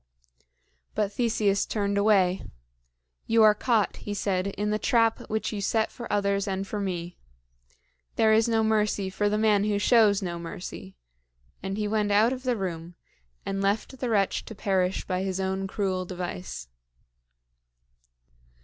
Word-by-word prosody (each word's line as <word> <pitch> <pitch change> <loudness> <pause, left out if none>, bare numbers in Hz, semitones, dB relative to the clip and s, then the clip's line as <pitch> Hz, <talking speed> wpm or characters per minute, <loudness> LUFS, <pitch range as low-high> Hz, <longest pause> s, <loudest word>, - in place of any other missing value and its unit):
But 205 -2 0
Theseus 215 -4 +1
turned 200 -2 -1
away. 195 -3 +3 0.9
"You 225 0 +5
are 215 -1 +7
caught," 220 -1 +1
he 205 - -5
said, 190 -1 -1
"in 205 +1 -2
the 215 - 0
trap 230 -1 +1
which 220 +1 -2
you 205 - -3
set 220 +2 0
for 240 - -8
others 200 0 +1
and 195 0 -2
for 210 +1 -4
me. 175 -3 -4 1.0
There 220 -1 +4
is 225 +1 +3
no 225 -1 +2
mercy 210 -3 +1
for 205 +2 0
the 210 - 0
man 210 -2 +3
who 210 -1 +1
shows 210 -2 +4
no 170 -2 -4
mercy;" 170 - -8 0.6
and 195 +2 -4
he 210 -1 -1
went 210 -1 0
out 215 +5 +4
of 260 - -6
the 250 -2 0
room, 175 -3 -5 0.5
and 195 0 -2
left 210 +6 -1
the 250 - -2
wretch 200 -4 +1
to 220 - -9
perish 190 -2 0
by 185 -1 -1
his 190 -1 -2
own 190 0 -1
cruel 190 -2 -1
device. 180 - -6
200 Hz, 160 wpm, -27 LUFS, 190-215 Hz, 1.0 s, are